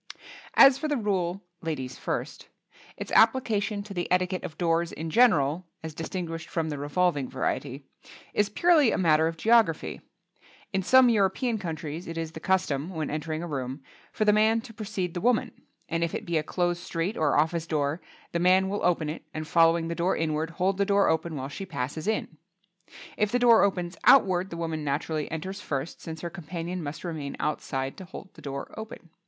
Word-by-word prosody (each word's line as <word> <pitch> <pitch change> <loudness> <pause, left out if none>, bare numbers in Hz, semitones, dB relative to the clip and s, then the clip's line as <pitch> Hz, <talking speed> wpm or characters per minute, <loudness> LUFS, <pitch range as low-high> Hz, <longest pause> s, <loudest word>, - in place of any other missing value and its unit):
As 270 -1 +8
for 310 - -2
the 295 -2 0
rule 195 -4 -1 0.2
"Ladies 145 -6 -4
first," - - -4 0.5
its - - -6
application 220 -3 +3
to 200 -1 -9
the 175 -2 -3
etiquette 180 0 +1
of 160 - -7
doors 170 -1 +1
in 160 +1 -5
general 170 - +3 0.2
(as 160 -1 -6
distinguished 165 0 -5
from 160 -2 -1
the 145 -2 -4
revolving 145 -1 0
variety) 135 +1 -3 0.5
is 210 0 +2
purely 310 +2 +4
a - - 0
matter 160 -3 +4
of 165 0 -4
geography. 225 -6 +2 0.7
In 195 - +1
some 255 +6 +6
European 220 +2 +1
countries 160 -1 -5
it 165 0 -6
is 165 -1 -3
the 160 - -8
custom, 160 -4 0
when 160 -5 -3
entering 155 +1 -3
a - - -4
room, 135 -2 -4 0.3
for 215 - 0
the 210 - +5
man 220 +2 +4
to 230 -1 -12
precede 205 -5 -4
the 175 - -4
woman, 245 0 +2 0.4
and 165 0 -1
if 170 - -2
it - - -5
be 170 -2 +1
a - - 0
closed 175 +2 -1
street 170 +5 -2
or 150 -3 +2
office 160 +2 +1
door, 150 +1 -1 0.3
the 170 - -1
man 185 +2 +4
will 205 +1 -3
open 170 -3 +2
it 155 - -5
and 155 0 -4
following 165 0 +4
the 170 - -2
door 175 +2 0
inward, 160 0 -1
hold 185 +3 -1
the - - +4
door 200 0 +3
open 160 0 0
while 135 -1 -4
she 145 +7 -7
passes 155 -1 -4
in. 215 -7 -2 0.8
If 210 -1 +1
the 245 - +3
door 240 -2 +6
opens 180 -3 0
outward 190 -7 +5
the 170 - -6
woman 160 -2 -3
naturally 150 +1 -2
enters 185 +5 -5
first, 140 -2 -4
since 160 -1 -7
her 170 - -5
companion 175 0 -5
must 145 -1 -6
remain 155 -5 -5
outside 135 -3 -2
to 190 - -8
hold 190 +1 -11
the - - -15
door 140 -1 -6
open. 220 -6 -9
170 Hz, 195 wpm, -27 LUFS, 155-195 Hz, 0.8 s, As